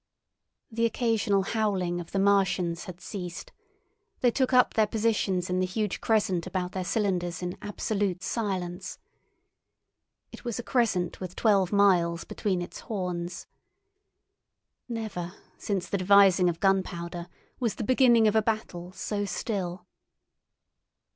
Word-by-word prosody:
The 230 +1 +2
occasional 225 -4 +1
howling 190 -5 0
of 165 - -11
the - - -2
Martians 195 -3 +2
had 180 -3 -9
ceased; 180 -5 -7 0.7
they 245 - +4
took 260 +2 +1
up 250 -1 +5
their 220 -1 +3
positions 210 -5 0
in 180 0 0
the 185 - +2
huge 205 +1 -2
crescent 200 -6 +1
about 185 -1 -2
their 190 -1 -3
cylinders 180 -3 -1
in 180 0 -3
absolute 205 -2 -2
silence. 185 -4 -3 1.3
It - - -11
was 240 -3 -3
a 240 - -4
crescent 205 -10 0
with 185 -1 -6
twelve 195 -5 +3
miles 180 -5 +3
between 185 -4 -2
its - - -9
horns. 180 -4 -4 1.4
Never 205 -6 -4 0.2
since 195 -4 -2
the 200 - -1
devising 190 -1 +6
of 165 -1 -4
gunpowder 175 -3 0 0.3
was 235 -4 0
the - - -4
beginning 240 -2 +5
of 210 - +2
a 220 - +5
battle 210 -5 -3
so 205 +1 -3
still. 185 -3 -3
195 Hz, 135 wpm, -28 LUFS, 180-220 Hz, 1.4 s, devising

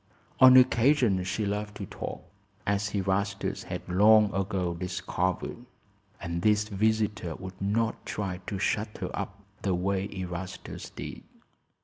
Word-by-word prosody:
On 130 0 +9
occasions 120 -6 +4
she 95 +3 -1
loved 105 +1 -3
to 100 - -5
talk, - - -6 0.4
as 100 +1 0
Erastus 100 +1 -1
had - - -6
long 105 +3 +5
ago 95 -2 -1
discovered; 90 +5 -3 0.5
and 85 -1 -3
this 105 +1 +4
visitor 105 -4 0
would 95 0 -9
not 110 +3 0
try 95 -4 -3
to 100 - -2
shut 105 +3 -1
her - - -4
up 100 +2 -5 0.2
the 95 -3 +1
way 95 +2 -1
Erastus 90 -1 -6
did. - - -7
100 Hz, 130 wpm, -28 LUFS, 95-105 Hz, 0.5 s, On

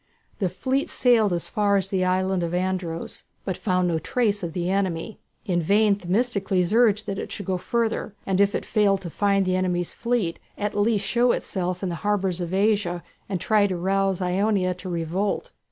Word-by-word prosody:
The 190 -4 +1
fleet 260 +10 -1
sailed 230 -5 +3
as 175 -2 -1
far 205 -1 +2
as 195 -1 -1
the 190 -2 0
island 185 0 +1
of 170 0 -2
Andros, 180 -2 -3 0.2
but 190 - -1
found 180 -2 0
no 165 -2 0
trace 210 +3 0
of 170 -3 -4
the 175 0 -2
enemy. 190 +1 -1 0.3
In 175 -5 +1
vain 205 +5 +4
Themistocles 195 -1 0
urged 220 -3 +4
that 195 -1 -3
it - - -6
should 200 - -5
go 185 -1 -1
further, 225 -1 -1
and 190 0 +1
if 200 +1 +3
it - - -3
failed 200 -3 +2
to 170 -3 -6
find 200 0 +2
the 185 0 +1
enemy's 180 -2 -1
fleet, 235 -8 -1 0.2
at 205 0 -2
least 205 -1 +1
show 240 +3 +3
itself 180 -1 -3
in 190 - 0
the - - -3
harbours 190 -3 0
of 175 -1 -3
Asia 195 -3 +1 0.3
and 190 -3 -1
try 210 0 +3
to 185 -2 -2
rouse 195 +1 0
Ionia 185 0 +1
to 180 +1 -8
revolt. 180 - -2
195 Hz, 195 wpm, -24 LUFS, 180-210 Hz, 0.3 s, vain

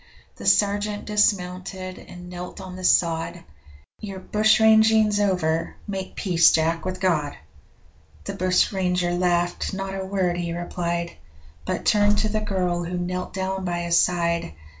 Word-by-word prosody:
The - - -6
sergeant 205 0 +2
dismounted 185 -2 -1
and 180 0 -12
knelt 180 +2 -8
on 185 -1 -8
the 185 - -8
sod 165 -2 +1 0.6
'Your 195 -2 -7
bushranging's 220 +1 +4
over 165 -5 0
make 190 -2 -5
peace, 175 -4 +4
Jack, 165 +1 0
with 185 0 -3
God!' 155 -6 0 0.9
The - - -5
bushranger 180 -1 +1
laughed 175 +1 0
not 195 0 -4
a 195 0 -4
word 190 -2 -1
he 170 -1 -3
replied, 170 0 -3 0.5
But - - -3
turned 205 -1 +3
to 215 +1 0
the 215 0 -1
girl 180 -4 -1
who 175 +1 -4
knelt 180 +1 -3
down 190 0 -2
by 175 -1 -2
his 170 0 0
side. 170 - 0
185 Hz, 140 wpm, -23 LUFS, 175-200 Hz, 0.9 s, bushranging's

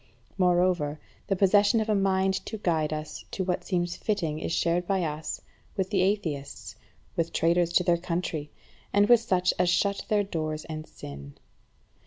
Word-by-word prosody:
Moreover, 175 -5 +2 0.3
the 195 - +1
possession 205 +3 +4
of 220 - -1
a 215 - +2
mind 190 -1 +2
to 220 - -4
guide 160 -6 0
us 155 0 -5
to 190 - -2
what 180 -1 -1
seems 175 -1 -1
fitting 170 -8 -1
is 160 - -3
shared 170 +1 +1
by 195 -2 +1
us, 155 -1 -3 0.4
with 190 +1 -1
atheists, 185 -8 -1 0.4
with 165 0 0
traitors 170 +1 +2
to 180 - +4
their 170 -1 +3
country, 170 -3 -3 0.4
and 205 0 +4
with 240 0 +7
such 185 -5 +1
as 180 - +3
shut 200 +3 +1
their 210 -1 +3
doors 155 -5 -3
and 155 -1 -6
sin. 70 0 -10
180 Hz, 165 wpm, -27 LUFS, 160-195 Hz, 0.4 s, with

